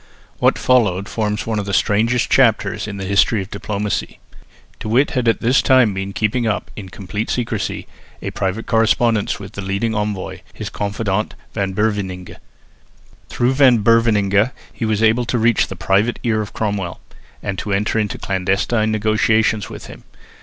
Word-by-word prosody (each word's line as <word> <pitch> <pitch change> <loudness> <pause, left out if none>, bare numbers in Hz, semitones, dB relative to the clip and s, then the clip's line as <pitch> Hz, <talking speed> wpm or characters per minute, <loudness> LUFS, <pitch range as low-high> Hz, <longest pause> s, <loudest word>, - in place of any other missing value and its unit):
What - - +3
followed 105 -7 +2
forms 105 -1 -2
one 110 -2 -1
of 100 - -4
the 100 - 0
strangest 115 +5 +2
chapters 110 -4 +2
in 100 -1 -6
the 95 - -5
history 100 +3 +3
of 95 - -14
diplomacy. 100 0 -3 0.6
De - - -6
Witt 125 +7 +2
had 125 -5 -1
all 115 - +5
this 125 +4 +3
time 130 -6 +4
been 95 +1 -4
keeping 110 +4 0
up, 105 - -2
in 100 -3 -8
complete 105 +3 -5
secrecy, 120 -2 -2 0.3
a - - -5
private 95 +4 -2
correspondence 115 -1 +2
with 100 -1 -9
the 100 - -7
leading 100 +4 -1
envoy, 105 -3 -3 0.2
his - - -6
confidant 105 0 -2 0.2
Van 95 -3 -2
Beverningh. 95 -3 -2 0.9
Through 125 +2 +1
Van 130 -5 +5
Beverningh 110 -2 +3 0.2
he 115 - -3
was 110 0 0
able 115 +2 +3
to 120 - -1
reach 115 0 +3
the 95 - -7
private 95 +6 +1
ear 110 -3 +1
of 105 - -6
Cromwell, 100 -5 -3 0.4
and 95 -1 -3
to 105 - -4
enter 105 +3 +1
into 105 -2 -2
clandestine 100 +4 0
negotiations 110 0 +1
with - - -9
him. - - -12
105 Hz, 165 wpm, -19 LUFS, 100-115 Hz, 0.9 s, all